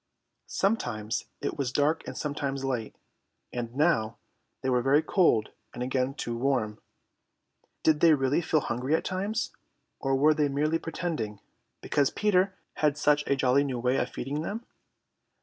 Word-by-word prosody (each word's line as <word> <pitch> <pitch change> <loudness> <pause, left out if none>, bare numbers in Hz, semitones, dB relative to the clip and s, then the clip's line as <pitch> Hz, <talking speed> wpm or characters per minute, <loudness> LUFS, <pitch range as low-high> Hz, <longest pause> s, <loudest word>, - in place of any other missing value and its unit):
Sometimes 120 - -1 0.2
it - - -3
was 130 -3 0
dark 150 +4 +1
and - - -6
sometimes 140 -2 -2
light, 120 -5 -2 0.6
and 120 -1 -4
now 135 -8 +2 0.5
they 130 - +1
were 125 -1 +3
very 140 +5 +4
cold 155 - +3 0.3
and 125 - -3
again 130 +1 0
too 120 -5 -3
warm. 120 -4 0 1.0
Did 155 -2 +4
they 165 -1 +6
really 135 +3 +1
feel 160 -1 +1
hungry 125 +6 0
at - - -2
times, 195 +4 -2 0.5
or 135 -1 +1
were 150 +3 +5
they 150 -2 +1
merely 150 +4 +1
pretending, 155 - -3 0.4
because 145 -2 +2
Peter 190 -2 +2 0.2
had 150 -1 +2
such 150 0 +3
a 140 - +3
jolly 135 +1 +3
new 135 -3 -2
way 125 +2 +1
of - - 0
feeding 145 +4 -4
them? 215 +8 -4
140 Hz, 155 wpm, -28 LUFS, 125-155 Hz, 1.0 s, they